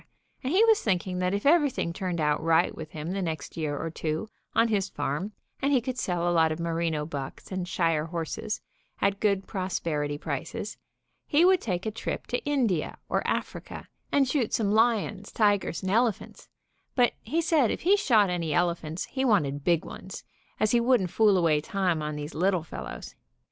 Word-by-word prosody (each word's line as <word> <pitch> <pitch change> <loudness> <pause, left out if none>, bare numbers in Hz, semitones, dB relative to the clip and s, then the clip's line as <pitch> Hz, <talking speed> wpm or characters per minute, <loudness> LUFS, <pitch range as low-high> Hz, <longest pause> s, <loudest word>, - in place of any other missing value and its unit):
and 260 - -1
he 385 +6 +5
was 445 -2 +4
thinking 185 -2 -1
that 180 0 +1
if 200 +4 -2
everything 285 - +3
turned 180 -2 -3
out 150 -1 +1
right 165 +1 +3
with 160 -1 -7
him 155 +2 -5
the 195 +1 -2
next 160 -5 -4
year 150 -3 -2
or 165 - -4
two, 160 +5 -3 0.3
on 230 - +5
his 200 -4 0
farm, 145 +8 -3 0.3
and 280 - +2
he 270 - +5
could 250 +1 -4
sell 175 -4 -1
a 175 - +2
lot 160 -1 +4
of 155 - -3
merino 165 -2 -1
bucks 140 0 -7
and 185 -1 -3
shire 165 -4 +1
horses 170 +6 -4 0.4
at 200 0 +1
good 200 -2 +1
prosperity 165 -7 -2
prices, - - -4 0.5
he 310 +4 +4
would 370 -1 +5
take 185 -3 -2
a 220 - -1
trip 220 - -4
to 245 - -2
India 245 - 0
or - - +1
Africa - - -4 0.2
and 275 -2 +3
shoot 255 -4 0
some 205 -3 +1
lions, 215 -3 +1
tigers 205 -6 +1
and 190 - -1
elephants, 225 -1 0 0.5
but 245 -2 +4
he 310 +10 -1
said 315 -7 +3
if - - -2
he 380 +4 +5
shot 235 - +4
any 170 -3 -2
elephants 170 -1 0
he 265 -1 -3
wanted 145 - +2
big 170 0 +2
ones, 190 - -8 0.4
as 215 - +2
he 240 - +4
wouldn't 235 -7 +2
fool 210 -3 +4
away 160 -4 +3
time 180 -2 0
on 150 0 -3
these 150 +1 -6
little 185 0 +1
fellows. 160 - -7
185 Hz, 190 wpm, -27 LUFS, 165-225 Hz, 0.5 s, he